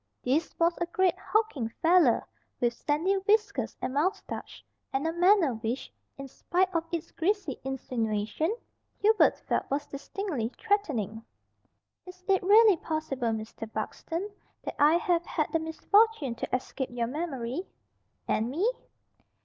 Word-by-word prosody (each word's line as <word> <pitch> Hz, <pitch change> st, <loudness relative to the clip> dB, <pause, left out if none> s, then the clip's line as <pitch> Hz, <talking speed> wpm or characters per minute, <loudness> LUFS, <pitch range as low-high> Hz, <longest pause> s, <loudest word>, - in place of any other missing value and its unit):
This 295 Hz, +6 st, 0 dB
was 335 Hz, 0 st, +3 dB
a 345 Hz, -, 0 dB
great 365 Hz, 0 st, +2 dB
hulking 375 Hz, -, 0 dB
fellow, 330 Hz, -7 st, +5 dB, 0.4 s
with 240 Hz, -1 st, +2 dB
sandy 305 Hz, +9 st, 0 dB
whiskers 425 Hz, -1 st, +1 dB
and 260 Hz, -, -2 dB
moustache, 345 Hz, +8 st, -2 dB, 0.3 s
and 270 Hz, +3 st, -1 dB
a 325 Hz, -, 0 dB
manner 355 Hz, -, +4 dB
which, 225 Hz, +3 st, -4 dB, 0.2 s
in 275 Hz, 0 st, -7 dB
spite 370 Hz, +7 st, 0 dB
of 330 Hz, -1 st, +1 dB
its 335 Hz, -1 st, -4 dB
greasy 370 Hz, -5 st, -1 dB
insinuation, 240 Hz, +1 st, -1 dB, 0.5 s
Hubert 435 Hz, +1 st, +4 dB
felt -, -, -2 dB
was 290 Hz, +2 st, -1 dB
distinctly 280 Hz, -, -4 dB
threatening. 270 Hz, -, -1 dB, 0.8 s
"Is 365 Hz, 0 st, -12 dB
it 385 Hz, -1 st, +3 dB
really 415 Hz, 0 st, +6 dB
possible, 305 Hz, -6 st, -2 dB
Mr. 220 Hz, 0 st, -4 dB
Buxton, 340 Hz, -, -4 dB, 0.4 s
that -, -, -4 dB
I 300 Hz, +3 st, +6 dB
have 345 Hz, 0 st, +1 dB
had 305 Hz, -, -1 dB
the 325 Hz, -, +2 dB
misfortune 320 Hz, -, +2 dB
to 235 Hz, -, -2 dB
escape 260 Hz, +1 st, -4 dB
your 240 Hz, -1 st, -1 dB
memory?" 280 Hz, +2 st, -4 dB, 0.6 s
"And 225 Hz, +2 st, +1 dB
me?" 365 Hz, -, +1 dB
320 Hz, 135 wpm, -29 LUFS, 255-370 Hz, 0.8 s, really